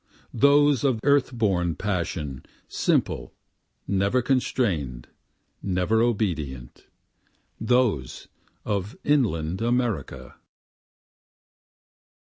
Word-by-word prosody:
Those 140 +1 +4
of 130 -5 +2
earth 140 -2 +3
born 95 -8 0
passion, 85 -9 -3 0.2
simple, - - -1 0.5
never 100 +6 +1
constrain'd, 95 - -1 0.5
never 95 +4 +1
obedient, 80 - -2 0.7
Those 115 - 0 0.4
of 100 0 -3
inland 95 - +1
America. 115 - -2
105 Hz, 70 wpm, -25 LUFS, 80-125 Hz, 0.7 s, Those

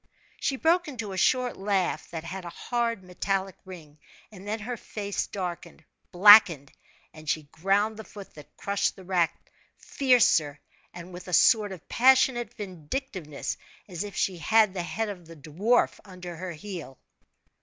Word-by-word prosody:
She 275 - -1
broke 335 +5 +2
into 230 -8 -6
a - - -5
short 250 +6 +1
laugh 195 -2 -1
that 165 -2 -6
had 185 +3 -7
a 175 - -7
hard, 230 +1 -2
metallic 190 +1 -2
ring, 160 -5 -12 0.3
and 200 -1 -12
then 215 +2 -2
her 245 +3 -4
face 205 -3 -4
darkened, 175 -4 -6 0.3
blackened, 180 -7 +7 0.4
and 155 -1 -9
she 155 - 0
ground 200 +5 +1
the 220 - -7
foot 200 -2 -12
that 150 -1 -15
crushed 200 0 -1
the 190 - -13
rat 175 -2 +2 0.5
fiercer, 220 - +2 0.3
and 175 +1 -11
with 180 +1 -10
a 180 - -6
sort 210 +1 +4
of 185 -4 -10
passionate 255 -1 +3
vindictiveness, 185 - -5 0.3
as 180 -1 -5
if 205 -3 -8
she 185 -3 -1
had 215 +3 +3
the 185 - -3
head 220 +6 -3
of 180 -5 -8
the 165 - -12
dwarf 170 - 0
under 180 -3 -9
her 180 0 -6
heel. 165 -5 -8
190 Hz, 160 wpm, -27 LUFS, 170-220 Hz, 0.5 s, blackened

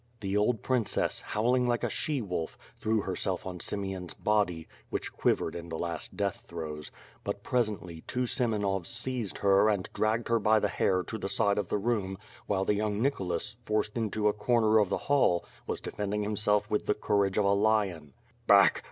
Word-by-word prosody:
The 100 -1 -2
old 105 +2 +2
princess, 125 -5 0
howling 125 +3 +1
like 120 -1 0
a - - +1
she 145 -6 -1
wolf, 90 -5 -3 0.2
threw 110 0 0
herself 95 -1 -2
on 90 -1 -5
Simeon's 95 -2 -3
body, 100 -6 0 0.2
which - - -4
quivered 80 - +1
in 85 0 -6
the 80 - -4
last 85 -2 -4
death 100 -2 -1
throes; 75 -3 -5 0.3
but - - -4
presently, 105 -9 -1
two 125 0 -1
Semenovs 105 -7 0
seized 120 -3 -3
her 100 +1 +4
and 100 -3 0
drag/];ed 110 +2 0
her 115 0 +3
by 110 +1 +4
the 105 - 0
hair 95 +1 +1
to 110 - -6
the 95 - -3
side 100 +1 +2
of 100 - -2
the - - 0
room, 100 -3 -1 0.3
while 95 -1 +1
the 105 - +3
young 105 0 -1
Nicholas, 95 -9 -1
forced 105 -2 -1
into 110 -2 0
a 105 - +3
corner 110 0 +3
of 105 -3 +2
the - - 0
hall, 135 -12 +3 0.2
was - - -2
defending 105 0 -3
himself 105 0 +1
with 105 - 0
the - - +2
courage 100 -2 +1
of 105 - +3
a 100 - +4
lion. 100 -8 +1 0.3
"Back! - - +6
105 Hz, 185 wpm, -30 LUFS, 95-110 Hz, 0.3 s, Back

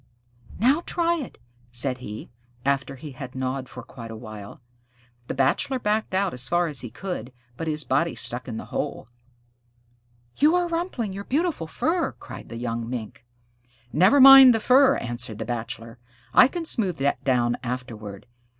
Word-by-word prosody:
"Now 265 - +3
try 340 0 +1
it," 285 -7 -7 0.3
said 125 +1 -1
he, 110 -3 -8 0.3
after 140 0 0
he 145 +3 -9
had 130 -1 -9
gnawed 130 0 -3
for - - -9
quite 115 -3 -10
a 115 - -7
while. 110 -3 -10 0.7
The - - -4
Bachelor 135 - +1
backed 215 -4 -1
out 190 -1 +1
as 125 0 -3
far 175 0 +2
as 150 -4 -5
he 120 - -7
could, 135 - -6 0.2
but 165 - -5
his 155 -1 -1
body 160 +6 0
stuck 125 +2 -1
in 115 -3 -5
the - - -6
hole. - - -3 1.3
"You 310 +4 +4
are 355 -1 +1
rumpling 330 - -3
your 200 +1 -7
beautiful 300 - -1
fur," 330 - -1
cried - - -11
the 115 - -7
young 115 -1 -3
Mink. 120 -2 -6 0.7
"Never 185 - +5
mind 270 -2 +10
the - - +1
fur," 265 +4 +5
answered 120 -2 -5
the - - -4
Bachelor. 115 0 -5 0.3
"I 255 - +8
can 340 +3 -5
smooth 200 - -1
that 140 +1 -1
down 120 -3 +1
afterward. 115 -6 -6
140 Hz, 170 wpm, -24 LUFS, -, 1.3 s, mind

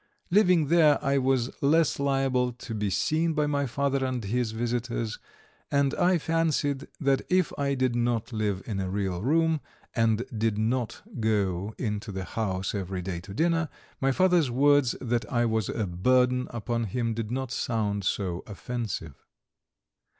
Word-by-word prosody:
Living 180 -6 +4
here, 155 -2 +5
I 140 0 +2
was 130 -1 +1
less 155 +1 +3
liable 135 -3 +1
to 115 -1 -8
be 105 -2 -1
seen 160 - +1
by 150 -1 +1
my 140 -1 0
father 140 +2 0
and 130 -3 -2
his 115 +3 -1
visitors, 115 -1 -2 0.5
and 140 -1 +2
I 180 0 +3
fancied 155 -4 0
that 135 -2 +2
if 185 -2 +2
I 140 -1 0
did 130 -2 +1
not 120 -1 0
live 105 -3 -1
in 105 -4 -3
a 95 -1 -2
real 95 -2 -2
room, 160 +4 +2 0.3
and 115 0 +2
did 110 -1 0
not 115 +2 -1 0.2
go 105 -2 0
into 105 -2 -3
the 95 -1 -4
house 95 -4 -2
every 95 -2 -3
day 90 -2 -3
to 95 +3 -10
dinner, 165 +2 +1 0.3
my 135 0 +2
father's 175 -1 +3
words 140 +1 +3
that 120 -1 -2
I 120 0 +2
was 110 -3 0
a 110 - -1
burden 125 +8 +2
upon 115 0 -2
him 115 +2 -1
did 110 -1 -4
not 130 0 -3
sound 105 -5 -1
so 95 -2 -1
offensive. 105 - -5
120 Hz, 160 wpm, -27 LUFS, 105-140 Hz, 0.5 s, here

